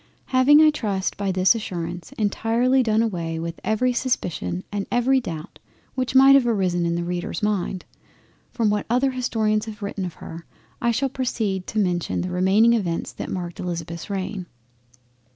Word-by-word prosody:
Having 285 +4 +7
I 310 - +6
trust 200 -9 -2
by 200 -1 -1
this 185 +2 +4
assurance 175 -6 -5
entirely 230 +5 +1
done 220 -2 +2
away 170 -7 -3 0.2
every 245 +4 +1
Suspicion 160 - -2
and 205 -1 -3
every 255 +2 +3
doubt 165 -8 -7 0.3
which 255 0 -2
might 270 +1 +8
have 270 -3 +5
arisen 180 -6 +1
in 170 - 0
the 170 - -2
Reader's 180 +5 -4
mind, 195 -3 -1 0.7
from 225 -3 +1
what 210 -1 -1
other 255 +3 +2
Historians 220 -4 0
have 215 -1 -8
written 200 -1 -4
of 180 -2 -5
her, 165 +1 -10 0.3
I 235 - +2
shall 260 +4 +1
proceed 220 -8 -2
to 220 - -5
mention 180 -4 0
the 180 0 -4
remaining 195 +6 +4
Events 180 -7 -1
that - - -6
marked 175 -2 -5
Elizabeth's 170 -1 -5
reign. 190 -1 -4
205 Hz, 165 wpm, -23 LUFS, 180-240 Hz, 0.7 s, might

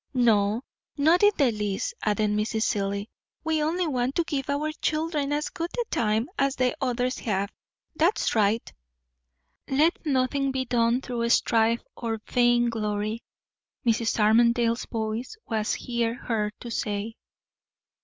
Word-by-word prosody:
"No, 220 -2 +3 0.3
not 320 +5 +4
in 415 - +7
the 275 -5 +4
least," 210 - -2
added 210 0 +1
Mrs. 215 +1 0
Seelye. 200 -1 -1 0.4
"We 320 -1 +1
only 340 +4 0
want 260 -3 -1
to 340 - +2
give 285 -5 -3
our 295 +2 0
children 310 -2 -1
as 295 +1 -1
good 340 -2 -4
a 475 - -1
time 220 +2 +1
as 275 0 +2
the 255 -1 +1
others 250 0 0
have. 200 -2 -1 0.4
That's 335 +7 +2
right." 215 +1 +1 1.0
"'Let 305 +6 +2
nothing 275 -1 +1
be 260 0 -2
done 240 0 +2
through 235 -3 -2
strife 230 0 +3
or 225 -2 -3
vainglory,'" 225 -3 +1 0.6
Mrs. 230 0 +1
Armadale's 235 +2 +3
voice 225 - -3
was 215 -2 -1
here 235 -1 -1
heard 215 -5 -2
to 240 - -7
say. 210 0 -2
235 Hz, 135 wpm, -26 LUFS, 220-275 Hz, 1.0 s, in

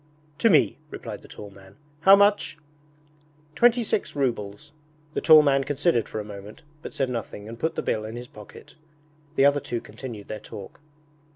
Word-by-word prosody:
'To 230 - +4
me,' 150 - +3
replied - - -8
the - - -15
tall 105 -1 -10
man. 95 0 -17 0.2
'How 190 +5 +8
much?' 200 -4 +2 1.0
'Twenty 240 +5 +4
six 205 - -2
rubles.' 130 0 -3 0.4
The - - -2
tall 155 -2 +8
man 135 -1 +3
considered 145 -4 0
for 110 - -4
a - - -4
moment, 105 +4 -11 0.2
but - - -9
said 135 - 0
nothing 110 -3 -6
and 115 +1 -9
put 160 +5 -1
the - - -3
bill 110 - -1
in 110 +1 -7
his 120 +1 -7
pocket. 105 -3 -14 0.6
The 135 - +4
other 145 0 +4
two 120 -3 -4
continued 115 -4 -9
their 110 - -6
talk. 100 -1 -11
125 Hz, 180 wpm, -25 LUFS, 105-155 Hz, 1.0 s, How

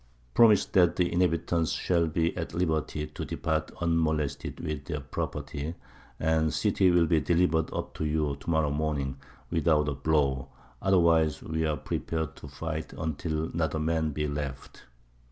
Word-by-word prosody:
Promise 110 -4 +6
that 90 -4 +5
the 90 -1 +1
inhabitants 85 -2 +1
shall 85 -2 +1
be 80 +1 0
at - - -4
liberty 80 -3 0
to 75 - -7
depart 80 0 -1
unmolested 80 -4 0
with 75 -2 -4
their 75 -3 -3
property, 70 +2 -4 0.4
and 80 0 +2
the - - -1
city 100 -1 +2
will 85 -1 +4
be 80 -1 +3
delivered 85 -2 +2
up - - -4
to 80 - -3
you 75 -2 0
to 70 +4 -8
morrow 80 -3 +2
morning 70 -3 -1 0.3
without 80 -2 +2
a 70 - 0
blow; 70 -3 +1 0.3
otherwise 85 -5 +3
we 80 0 -1
are 75 -1 0
prepared 80 +3 -3
to - - -10
fight 80 +3 -5
until 80 0 -3
not 80 -2 0
a - - 0
man 80 0 0
be 75 +1 -2
left." 70 -2 -6
80 Hz, 160 wpm, -28 LUFS, 75-85 Hz, 0.4 s, Promise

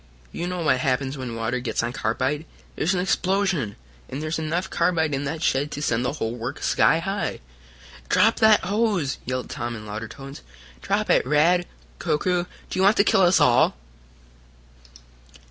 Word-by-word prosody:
You 175 - -4
know 180 -1 -3
what 130 -5 +3
happens 130 +1 0
when 130 -4 -5
water 115 +2 -2
gets 120 -1 -2
on 120 +1 -2
carbide 130 +8 -1 0.3
there's 180 +5 0
an - - 0
explosion, 185 - 0 0.3
and 135 - -5
there's 155 +1 -2
enough 165 +4 -2
carbide 160 -6 +1
in 140 +1 -2
that 160 +3 -4
shed 140 +2 +1
to 145 - -5
send 120 -4 +1
the 125 - -1
whole 115 -6 -3
works 120 +4 -4
sky - - +4
high. 195 +4 -3 0.7
"Drop - - +4
that 220 -1 +5
hose!" 200 -9 0
yelled 130 0 -3
Tom 120 0 -4
in 110 -1 -9
louder 110 +2 -5
tones. 135 +4 -10 0.4
"Drop - - 0
it, - - +4
Rad 165 +6 +3 0.3
Koku! 175 +3 0 0.3
Do 185 - -2
you - - +3
want 200 +3 +5
to - - +6
kill 195 - +3
us 180 0 +5
all!" 120 -1 +4
150 Hz, 175 wpm, -24 LUFS, 125-180 Hz, 0.7 s, to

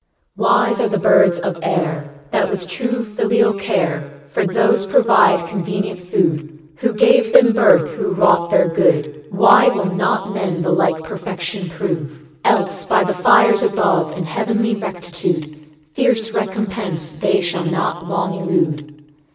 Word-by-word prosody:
Wise - - +1
are - - 0
the - - -1
birds 180 -3 +3
of 175 -1 -4
air 160 -4 -2 0.2
I - - +2
1 - - +1
That - - -8
with 185 -3 -5
true 240 +5 -3
filial 220 +1 0
care 175 -8 -2 0.2
For 190 - -1
those 200 +1 +1
provide 195 -4 +3
convenient 195 +1 -4
food 160 -4 -2 0.2
Who 235 +7 -1
gave 220 +1 +3
them 235 -2 +6
birth, 215 -8 +4
who - - -3
wrought 170 -2 +3
their - - +3
good. 150 -2 0
Why 200 +3 +5
will 195 -2 0
not 190 +2 -1
men 185 -4 -3
the 175 - -1
like 170 -2 +1
perfection 180 +2 -6
prove? 160 -2 -5 0.2
Else, - - 0
by - - +2
the - - -1
fires - - +4
above, 195 - 0
And 180 - -4
heavenly 220 +6 -1
Rectitude, 175 -6 -5 0.2
Fierce 225 +4 0
recompense 195 -6 -4
they 195 +1 +1
shall 175 -1 -3
not 170 +1 -3
long 190 - -2
elude. 150 -4 -3
180 Hz, 150 wpm, -18 LUFS, 165-205 Hz, 0.2 s, them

